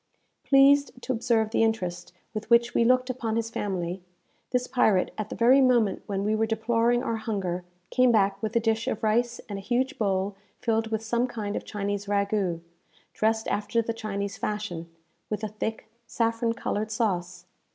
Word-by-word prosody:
Pleased 275 -1 +5
to 260 - -1
observe 225 -2 +1
the - - +2
interest 205 -6 -1 0.2
with 215 0 -5
which 235 0 +4
we - - +3
looked 255 +2 +3
upon 230 -3 -3
his 225 0 -1
family, 185 -4 -3 0.5
this 250 -1 0
pirate, 220 -7 +2
at 215 0 -4
the - - -5
very 255 +4 +5
moment 240 -7 +3
when 195 -1 -2
we 210 +1 +1
were 220 +1 +1
deploring 230 +2 +1
our 230 - -1
hunger, 195 -5 -3 0.3
came 255 -1 +4
back 200 -3 +2
with 220 +1 -3
a - - +5
dish 225 0 0
of - - -2
rice 235 +2 +1
and 200 -2 -5
a - - -8
huge 255 +7 -1
bowl 195 -1 0 0.2
filled 225 -1 0
with 220 0 -2
some 235 +3 0
kind 210 -4 -4
of - - -4
Chinese 205 -1 -3
ragoût, 200 -4 0 0.5
dressed 220 +1 +1
after 210 +3 0
the 230 0 -1
Chinese 200 -3 -4
fashion, 195 -6 -3 0.4
with 210 0 -3
a 215 - -1
thick 220 +1 -4 0.2
saffron 230 0 0
coloured 220 -2 -2
sauce. 180 -5 -2
220 Hz, 180 wpm, -27 LUFS, 200-235 Hz, 0.5 s, Pleased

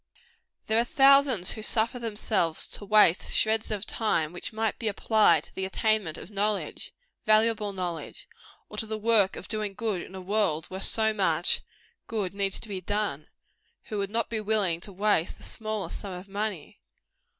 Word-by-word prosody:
There 220 +1 +2
are - - +4
thousands 270 -6 +5
who 220 - -4
suffer 225 +2 +1
themselves 210 -7 0
to 205 - -6
waste 205 -4 +4
shreds 220 0 +2
of 210 -2 -3
time 170 -8 0
which 175 - -6
might 220 -1 -2
be 225 - -2
applied 205 -6 +3
to - - -13
the 190 - -4
attainment 200 -3 0
of 195 - -10
knowledge 205 0 -2 0.4
valuable 215 -1 +3
knowledge 180 -4 -5 0.4
or - - -9
to 220 - -2
the 220 0 -3
work 215 -3 +3
of - - -8
doing 215 -3 -3
good 210 -5 -2
in 190 - -10
a - - -6
world 185 -5 0
where 190 - -5
so 220 +2 +2
much 175 -5 +2 0.5
good 205 -5 -3
needs 195 -1 -1
to - - -8
be 195 -3 -5
done, 205 -7 -2 0.6
who 210 - -3
would 200 -1 -2
not 230 +2 0
be 220 -2 -3
willing 205 -6 +1
to 200 - -8
waste 195 -3 +1
the - - -15
smallest 215 -2 -4
sum 200 -3 -7
of 180 +2 -8
money. 200 -5 -4
210 Hz, 180 wpm, -27 LUFS, 190-220 Hz, 0.6 s, thousands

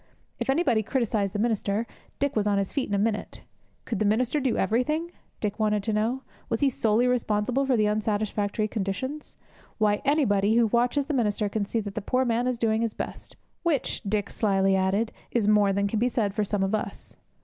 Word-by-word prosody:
If - - -3
anybody 270 -6 +3
criticized 215 -4 0
the - - +1
minister, 215 -1 0 0.3
Dick 285 0 -1
was 210 -1 +1
on 205 -1 +2
his 195 -1 -1
feet 275 -6 -1
in 205 - 0
a - - +2
minute. 210 +1 -2 0.4
Could 230 - -3
the - - +2
minister 240 +7 +2
do 260 -4 0
everything? 300 - 0 0.3
Dick 210 0 -3
wanted 210 -1 +1
to 220 - -1
know. 230 +5 0 0.3
Was 230 -2 -1
he 280 - +4
solely 225 0 +2
responsible 250 +2 +1
for 255 -3 +3
the 215 - +3
unsatisfactory 210 0 0
conditions? 220 +9 -4 0.4
Why, 210 -2 +2
anybody 220 -8 +2
who 235 0 +5
watches 245 +5 +1
the 300 - -3
minister 210 -4 +1
can 205 0 -1
see 225 +3 -1
that 205 -1 -6
the 215 - -3
poor 255 +5 +1
man 240 +1 +1
is 250 -1 0
doing 225 -1 +1
his 230 -2 -1
best, - - -6 0.3
which, 325 -6 0
Dick 205 -1 -2
slyly 195 -2 +2
added, 195 +4 +1 0.2
is 225 -4 0
more 210 -2 +4
than 200 +1 +1
can 210 +1 -1
be 245 +2 +2
said 215 -5 0
for 210 0 0
some 205 -1 -1
of 195 +2 -1
us! 215 - -4
220 Hz, 205 wpm, -26 LUFS, 205-245 Hz, 0.4 s, who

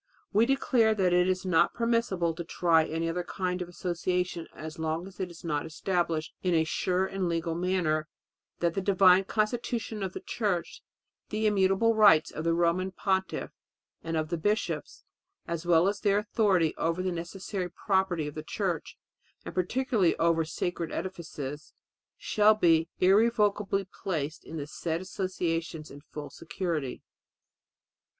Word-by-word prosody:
"We 220 +3 +4
declare 255 -5 +3
that 185 -3 +2
it 180 0 +4
is 185 0 0
not 180 -3 +3
permissible 230 -8 +1
to 170 - -5
try 165 -1 +3
any 165 +1 -2
other 170 +2 -1
kind 180 0 -3
of 175 - -5
association 175 -1 -2
as 155 0 -8
long 160 +2 -2
as 195 0 -13
it 185 -2 -2
is 170 - -13
not 150 -3 -1
established 165 -1 -1
in 180 -2 +1
a 160 - +4
sure 180 +3 0
and 190 -2 -2
legal 165 0 -1
manner 170 -3 0 0.5
that 170 -1 +2
the 195 - -1
divine 190 -1 +5
constitution 220 +1 -1
of 190 -1 -3
the - - -5
Church, 205 -7 -2 0.5
the 215 +1 -1
immutable 200 +2 +3
rights 205 -8 +6
of 155 - -5
the 165 0 +2
Roman 175 +2 +1
Pontiff 190 0 -1 0.5
and 165 0 -2
of 155 -1 -1
the 170 -1 -2
bishops, 210 +6 -2 0.4
as 170 0 -4
well 170 +1 +5
as 200 0 -1
their 200 -1 +2
authority 205 -6 +2
over 165 +2 0
the 185 - 0
necessary 180 +2 -4
property 190 -4 0
of 150 - -5
the 155 - -5
Church, 170 0 -3 0.5
and - - -6
particularly 200 0 +1
over 165 0 +3
sacred 170 +1 -3
edifices, 155 -6 -6 0.4
shall 215 0 +4
be 165 -5 +3
irrevocably 205 0 +3 0.2
placed 160 -4 -3
in 165 - -7
the 145 - -4
said 160 +2 -3
associations 170 -4 -3
in 145 - -11
full 150 -1 -8
security." 165 -5 -4
180 Hz, 155 wpm, -29 LUFS, 165-195 Hz, 0.5 s, rights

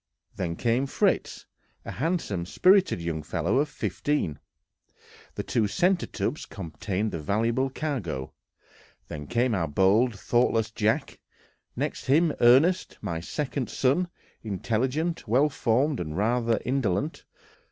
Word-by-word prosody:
Then 85 -3 -2
came 120 +7 +1
Fritz, - - 0 0.4
a - - -5
handsome, 135 - -2
spirited 185 - +4
young 85 -2 -3
fellow 100 - 0
of 150 +1 +1
fifteen; 115 - -2 1.0
the - - -3
two 110 -3 +1
centre 175 - +1
tubs 115 +8 -3
contained 95 +4 -3
the 80 - -4
valuable 115 - 0
cargo; 120 - -4 0.8
then 75 -1 -6
came 120 - +1
our 85 -5 0
bold, 100 - +3
thoughtless 115 -2 +1
Jack; 110 +7 -1 0.6
next - - -3
him 155 +3 +4
Ernest, 140 +10 +4
my 85 -1 -2
second 135 - -3
son, 140 +8 +1 0.3
intelligent, 130 - -2
well 130 +7 +3
formed, 135 +1 +1
and 75 -1 -4
rather 115 +1 +1
indolent. 130 - -1
115 Hz, 120 wpm, -27 LUFS, 95-140 Hz, 1.0 s, spirited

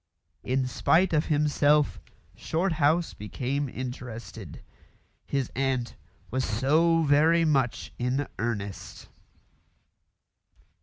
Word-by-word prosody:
In 130 +1 0
spite 165 +8 +2
of 155 0 +2
himself 150 -1 +2 0.4
Shorthouse 160 -1 +1
became 130 +6 -3
interested. 125 -2 -7 0.6
His 135 -2 -2
aunt 130 -3 -1 0.4
was 130 +2 0
so 160 +9 +2
very 160 +3 +4
much 135 -6 0
in 130 +3 -1
earnest. 100 -4 -5
140 Hz, 85 wpm, -27 LUFS, 125-155 Hz, 0.6 s, very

